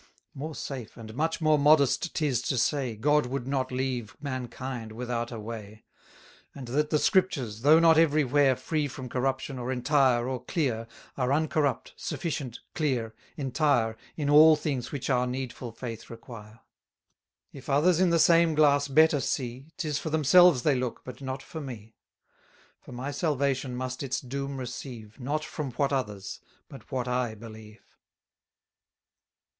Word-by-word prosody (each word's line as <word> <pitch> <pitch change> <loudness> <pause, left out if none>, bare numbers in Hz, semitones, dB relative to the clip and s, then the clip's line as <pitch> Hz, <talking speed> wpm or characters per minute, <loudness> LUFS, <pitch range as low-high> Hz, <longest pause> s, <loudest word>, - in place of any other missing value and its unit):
More 150 +3 -6
safe, 125 -6 -7
and 110 -2 -9
much 160 +6 -1
more 155 -1 +4
modest 150 +2 +3
'tis 140 -7 +1
to 130 - -1
say, 130 -1 0
God 145 +5 +2
would 130 -1 -3
not 130 -1 -1
leave 125 -4 -3
mankind 130 -4 -5
without 120 0 -3
a 115 - -6
way: 110 -1 -8 0.7
And 135 -3 -8
that 150 +4 0
the 155 - +2
Scriptures, 140 - +1
though 150 +5 +7
not 165 -1 +6
every 155 -2 +4
where 135 0 +3
Free 150 +2 -2
from 130 -1 -8
corruption, 130 +1 -2
or 125 +1 -3
entire, 130 -2 +2
or 130 -2 -4
clear, 125 -7 -1 0.3
Are 130 -1 0
uncorrupt, 145 -3 0
sufficient, 140 -8 -4
clear, 125 -8 -1 0.2
entire, 135 -5 +1 0.2
In 150 -3 -2
all 155 +2 +8
things 140 -5 -3
which 140 - -4
our 125 -1 +2
needful 125 -1 -5
faith 115 -1 -8
require. 115 -2 -11 0.9
300 140 - -10
If 135 - -12
others 155 +5 +3
in 185 -1 +4
the 170 - +3
same 165 -1 +5
glass 145 -2 +4
better 155 +1 +4
see, 130 0 -3
'Tis 150 -3 -2
for 160 - -4
themselves 160 -1 +5
they 150 - +3
look, 125 -2 -3
but 130 - -9
not 130 0 -5
for 160 - -7
me: 115 -5 -9 0.9
For - - -14
my 130 +3 -5
salvation 140 -3 -1
must 130 0 -4
its 130 -2 -2
doom 140 +1 -5
receive, 120 -3 -8
Not 150 +4 -2
from 150 -4 -5
what 140 +3 0
others, 105 -7 -3 0.3
but 135 - -13
what 130 -2 -2
I 125 -2 -1
believe. 110 -1 -12
130 Hz, 160 wpm, -28 LUFS, 120-150 Hz, 0.9 s, all